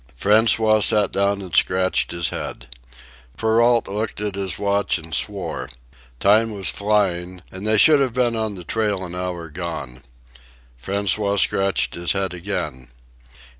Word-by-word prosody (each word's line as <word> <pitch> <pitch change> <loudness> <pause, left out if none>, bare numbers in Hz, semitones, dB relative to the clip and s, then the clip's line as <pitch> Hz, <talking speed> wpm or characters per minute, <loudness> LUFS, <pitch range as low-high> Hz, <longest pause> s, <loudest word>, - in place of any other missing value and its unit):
François 110 +1 +4
sat 105 0 +3
down 100 0 0
and 90 -4 -6
scratched 95 +2 +2
his 85 0 -2
head. - - -7 0.6
Perrault 115 +1 +2
looked 105 +2 -4
at 105 -1 -2
his 95 -3 -3
watch 100 -2 0
and 80 -1 -11
swore. 100 0 -3 0.5
Time 110 +3 +4
was 100 -4 -1
flying, 95 -4 -1
and 95 +3 -6
they 110 0 +3
should 150 +6 +6
have 135 -2 +1
been 120 -2 +1
on 110 -2 -2
the 90 - -8
trail 105 0 -1
an 85 - -9
hour 90 -2 -4
gone. 75 -7 -6 0.8
François 100 +2 0
scratched 95 +1 +2
his 85 0 -1
head 95 -2 -2
again. 80 -8 -5
100 Hz, 145 wpm, -21 LUFS, 90-110 Hz, 0.8 s, should